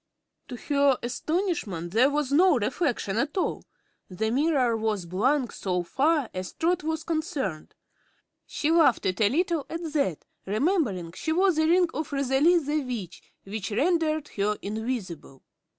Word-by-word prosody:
To 250 - -7
her 280 0 +2
astonishment 250 - -2
there 240 +7 +4
was 290 -2 -1
no 340 +1 +5
reflection 240 - -1
at 285 +8 -1
all; 370 - -1 0.5
the 220 +4 -2
mirror 265 -3 +2
was 215 -4 -1
blank 245 - +1
so 180 -2 -2
far 285 - +1
as 185 0 -5
Trot 345 +2 0
was 320 0 -2
concerned. 300 - -3 0.7
She 310 - -1
laughed 325 -7 +4
a 195 +3 +2
little, 335 - 0
at 335 +1 -5
that, 275 - -1 0.2
remembering 215 - 0
she 315 - -4
wore 375 +4 +4
the 315 -1 +1
ring 355 +1 +4
of 310 0 -4
Rosalie 280 +5 +3
the 300 -1 0
Witch, 230 -10 -6 0.2
which 200 0 -5
rendered 310 - 0
her 210 +1 -1
invisible. 205 - -5
270 Hz, 145 wpm, -26 LUFS, 210-315 Hz, 0.7 s, no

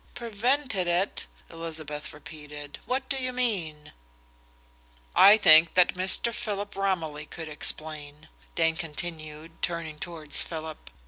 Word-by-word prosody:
"Prevented 235 -3 -1
it?" 175 +3 0 0.2
Elizabeth 155 -2 -6
repeated. 150 -1 -10
"What 260 +2 -2
do 275 - 0
you 255 -1 -2
mean?" 190 -12 -3 1.2
"I 205 +2 +9
think 160 -5 +7
that 180 -1 +5
Mr. 190 +5 +3
Philip 205 -1 -4
Romilly 165 -6 -2
could 160 -1 -8
explain," 150 0 -1 0.3
Dane 165 -1 +2
continued, 160 0 -6
turning 165 -3 -3
towards 160 -4 -2
Philip. 160 - -7
165 Hz, 115 wpm, -27 LUFS, 155-200 Hz, 1.2 s, I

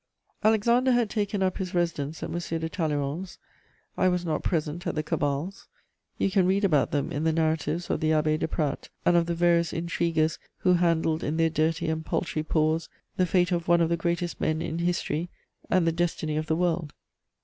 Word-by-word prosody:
* - - -36
Alexander 235 +4 +3
had 240 -3 +1
taken 205 -2 -1
up 185 -1 0
his 185 -1 -4
residence 160 -3 -1
at - - -4
M. 170 - -2 0.2
de 160 - -2
Talleyrand's. 155 +1 -2 0.6
I - - +2
was 180 -1 0
not 160 - -1
present 165 +2 -2
at - - -2
the 155 - -1
cabals: 145 +6 -2 0.5
you 195 - +1
can 185 -1 +3
read 195 +2 +2
about 155 -7 +3
them 145 -1 -1
in 145 - -2
the 160 - +3
narratives 160 +1 0
of - - -1
the 155 - +1
Abbé 155 0 +2
de - - 0
Pradt 150 -3 -2 0.2
and 175 - +4
of 170 -1 +3
the 170 - -1
various 170 -1 +3
intriguers 165 -1 0 0.2
who 180 - +4
handled 165 -2 +1
in 150 +2 -1
their 165 -1 +2
dirty 160 +2 0
and 160 0 -1
paltry 160 -1 -2
paws 155 +1 0 0.3
the 185 -2 +2
fate 180 +1 +2
of 170 -1 -1
one 170 0 +5
of 165 -1 +2
the 170 - +2
greatest 170 +1 -2
men 155 0 +1
in 165 0 -3
history 175 -1 -1 0.4
and 185 -2 +3
the 165 - +3
destiny 165 -2 -1
of 155 0 -2
the 160 - +1
world. 165 -3 -1
165 Hz, 205 wpm, -27 LUFS, 155-180 Hz, 0.6 s, one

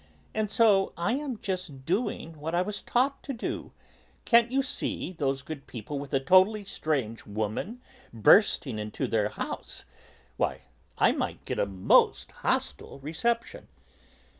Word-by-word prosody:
"And 215 -1 0
so 210 -3 +4
I 170 +7 0
am 275 -3 -3
just 180 -9 -4
doing 175 - -2
what 160 +3 -3
I 175 - +3
was 210 +1 -4
taught 270 +3 +1
to 275 - -5
do. 230 - -4 0.5
Can't 235 0 +5
you 270 +1 +2
see 255 - -2
those 135 -4 -1
good 145 -2 -8
people, 125 +5 -5
with 140 -1 -7
a 135 - +3
totally 190 +8 +4
strange 135 - -2
woman 110 - -3 0.3
bursting 120 - +4
into 105 0 -3
their 105 -2 +1
house? - - -5 0.5
Why, - - 0 0.4
I - - +5
might - - -3
get - - -3
a - - +2
most 95 -1 +3
hostile - - -2
reception." 230 - -2
175 Hz, 145 wpm, -28 LUFS, 135-220 Hz, 0.5 s, Can't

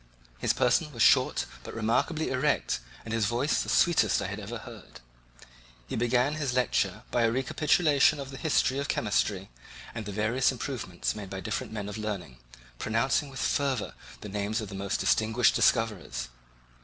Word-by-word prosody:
His - - +2
person - - +2
was - - +1
short - - +4 0.2
but - - -8
remarkably 120 +8 0
erect 135 +3 +1 0.3
and 110 - -4
his 110 -2 +1
voice 120 +6 +1
the - - -4
sweetest 150 - +3
I - - -2
had 100 +2 -4
ever 110 +3 -6
heard. 115 -3 -12 0.9
He - - -5
began 120 +4 +2
his 140 -5 -1
lecture 125 -2 +1
by 120 - +2
a 115 -1 +3
recapitulation 150 +3 +3
of 135 -1 -6
the 135 - -8
history 140 -3 +1
of 140 - -2
chemistry 100 - 0 0.4
and 115 -3 -6
the - - -4
various 110 +6 +1
improvements 120 -8 -3
made 105 -3 -7
by 95 0 -5
different 105 +2 -4
men 105 -2 -4
of 105 +1 -6
learning, 90 - -5 0.4
pronouncing 115 +6 +1
with 135 -1 -6
fervour 130 - 0 0.3
the 105 - -7
names 105 +2 -2
of 110 -3 -5
the - - -9
most 100 0 -2
distinguished 110 +2 +3
discoverers. 90 - +1
115 Hz, 170 wpm, -28 LUFS, 105-135 Hz, 0.9 s, short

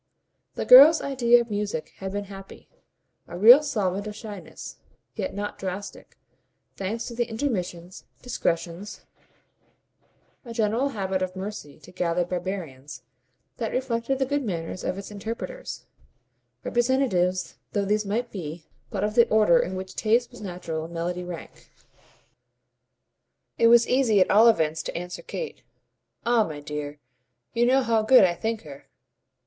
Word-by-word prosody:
The - - -3
girl's 285 +6 +9
idea 240 -3 +3
of 235 -2 -7
music 205 -6 -3
had 190 0 -5
been 205 +1 -3
happy 195 -1 -12 0.6
a 175 - -8
real 240 +9 +9
solvent 205 -8 -2
of 210 - -6
shyness, 205 -4 -9 0.4
yet - - -3
not 205 0 -5
drastic; 190 +2 -7 0.6
thanks 210 +4 -3
to 240 - -7
the 240 0 0
intermissions, 185 -8 -4
discretions, 175 -4 -3 1.4
a 235 -3 -8
general 230 +4 +1
habit 190 -1 -1
of 185 0 -3
mercy 190 -6 -7
to - - -14
gathered 175 -1 -1
barbarians, 175 -7 -5 0.5
that - - -3
reflected 255 0 -1
the 265 - +1
good 285 +1 -1
manners 180 -4 -4
of 185 - -2
its 195 +1 -8
interpreters, 225 - -6 0.8
representatives 235 -8 0
though 205 -1 0
these 210 +2 +1
might 225 +4 -2
be 165 -4 -7 0.2
but 200 -1 -3
of 210 0 0
the 235 +1 +5
order 210 -6 +5
in 185 - -2
which 185 0 -6
taste 235 +3 +1
was 245 - -12
natural 175 -5 -5
and 170 - -10
melody 175 +2 -3
rank. 175 -1 -10 1.9
It 230 - +6
was 235 0 +6
easy 250 -5 +3
at 185 - +3
all 220 +3 +7
events 160 -8 +2
to - - -5
answer 180 +1 -6
Kate. 485 - -6 0.6
"Ah 235 -1 +4
my 155 -6 -6
dear, 150 0 -6 0.6
you 240 +1 +2
know 265 +1 +4
how 225 -2 +2
good 235 +1 +6
I 180 -2 +3
think 220 +5 -3
her!" 140 -3 -12
205 Hz, 150 wpm, -25 LUFS, 180-235 Hz, 1.9 s, girl's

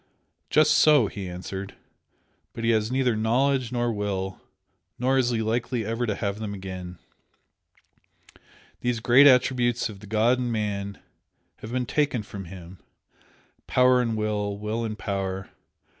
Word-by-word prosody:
"Just 155 0 +4
so!" 150 -7 +5
he 100 -2 -6
answered 95 +2 -7 0.8
"But 115 - -6
he 115 - +3
has 110 0 +1
neither 130 -3 +1
knowledge 125 +3 +1
nor 120 -1 0
will 95 -2 -3 0.6
nor 130 +2 +2
is 125 -2 +2
he 115 -2 0
likely 115 +1 -1
ever 115 +2 -2
to 105 - -1
have 100 +1 -3
them 105 -2 -4
again. 95 -2 -7 1.8
These 120 -1 -1
great 125 +5 +6
attributes 125 -2 +3
of 100 -2 -10
the 105 - -12
god 110 +4 +2
in 120 -1 -2
man 100 -3 -3 0.6
have 110 - -9
been 125 0 -1
taken 130 -4 0
from 100 -2 -8
him. 90 0 -11 0.9
Power 125 0 +4
and 115 -2 -1
Will! 105 -1 -1
Will 105 +3 -3
and 110 -1 -4
Power! 95 -2 -4
110 Hz, 145 wpm, -25 LUFS, 100-125 Hz, 1.8 s, great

